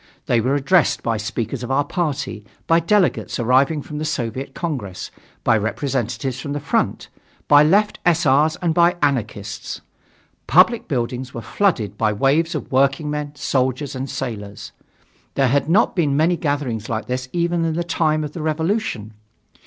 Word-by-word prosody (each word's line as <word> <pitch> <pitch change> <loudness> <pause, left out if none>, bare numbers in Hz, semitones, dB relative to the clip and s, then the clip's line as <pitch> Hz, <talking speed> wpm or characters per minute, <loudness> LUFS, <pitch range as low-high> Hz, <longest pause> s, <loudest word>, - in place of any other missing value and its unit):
They 120 -2 +2
were 130 +5 +1
addressed 145 +3 +2
by 115 -1 0
speakers 115 +3 -3
of 125 - -5
our 135 +2 +2
party, 140 -10 -3 0.2
by 165 0 +4
delegates 185 +2 +1
arriving 135 +5 +2
for - - -11
the 150 +1 -3
Soviet 135 -2 -3
Congress, 125 - -4 0.3
by - - +4
representatives 125 +2 -2
from 140 +1 -4
the 145 - -2
front, 145 - -1 0.4
by 145 0 +7
left 200 +8 +3
S.R.'s 155 -3 +3
and 170 -2 +2
by 170 +1 +4
Anarchists. 110 -7 -2 0.7
Public 205 +7 +4
buildings 125 0 -3
were 115 - -4
flooded 110 - 0
by 110 -1 +2
waves 150 - +1
of 150 - -5
working 135 +3 +2
men, 150 0 -4
soldiers 130 0 -1
and 130 0 -4
sailors. 105 -4 -6 0.6
There 135 -2 +3
had 140 +4 +1
not 190 +6 +3
been 145 -6 +1
many 165 +3 +3
gatherings 140 -8 -2
like 110 0 -2
that 130 +1 -3
even 170 -1 0
in 165 -1 0
the 175 - -1
time 155 -2 0
of 150 - -5
the 165 - -6
Revolution. 155 - -2
140 Hz, 160 wpm, -21 LUFS, 125-160 Hz, 0.7 s, by